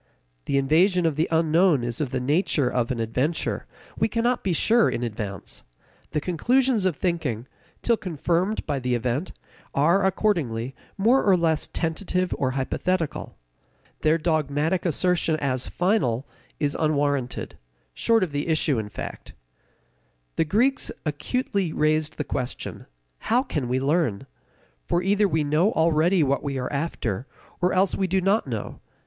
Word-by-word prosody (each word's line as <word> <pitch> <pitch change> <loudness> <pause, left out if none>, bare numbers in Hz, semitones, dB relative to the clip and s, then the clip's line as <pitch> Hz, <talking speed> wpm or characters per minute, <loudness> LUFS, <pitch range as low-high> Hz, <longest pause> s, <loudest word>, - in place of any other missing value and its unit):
The 140 - +1
invasion 170 +6 +3
of 160 -3 +1
the 155 +3 +1
unknown 165 -2 +3
is 120 +3 -2
of 145 - -1
the 130 - -2
nature 145 +1 +1
of 125 -1 0
an 125 - -2
adventure; 125 +8 -1 0.3
we - - +1
cannot 240 +2 0
be 190 - 0
sure 225 +7 +4
in 120 - -2
advance. 105 -5 -5 0.5
The 150 - -1
conclusions 230 - +2
of 180 - -1
thinking, 145 - -2 0.4
till 235 -1 +3
confirmed 180 +3 -1
by 140 - -1
the 125 -1 0
event, 125 +8 -2 0.4
are, 170 +8 +3
accordingly, 155 - 0 0.2
more 235 +7 +4
or 195 -3 +4
less 160 -2 +1
tentative 180 +2 -1
or 130 - +1
hypothetical. 165 +5 -2 0.6
Their 155 +1 +3
dogmatic 155 +2 0
assertion 170 0 +1
as 130 -4 -1
final 175 - +1 0.3
is 145 -1 0
unwarranted, 145 -5 -1 0.3
short 225 - +2
of 175 - -2
the 145 +2 -2
issue, 155 -5 +1
in 105 -1 -5
fact. - - -8 1.0
The - - +2
Greeks 245 - +1 0.2
acutely 190 - -1
raised 155 0 +1
the 150 - -1
question: 130 -3 -5 0.3
How 245 +3 +2
can 150 - -3
we 130 +1 +1
learn? 140 - 0 0.6
For 175 - +1
either 205 +2 +3
we 160 -4 +1
know 155 +8 +2
already 165 +2 +3
what 140 0 +1
we 140 -2 -3
are 125 +3 -3
after, 135 - -2 0.3
or 180 +1 +3
else 190 +1 +2
we 190 - 0
do 190 +1 +1
not 195 -1 +1
know. 115 -5 -5
160 Hz, 150 wpm, -25 LUFS, 135-185 Hz, 1.0 s, sure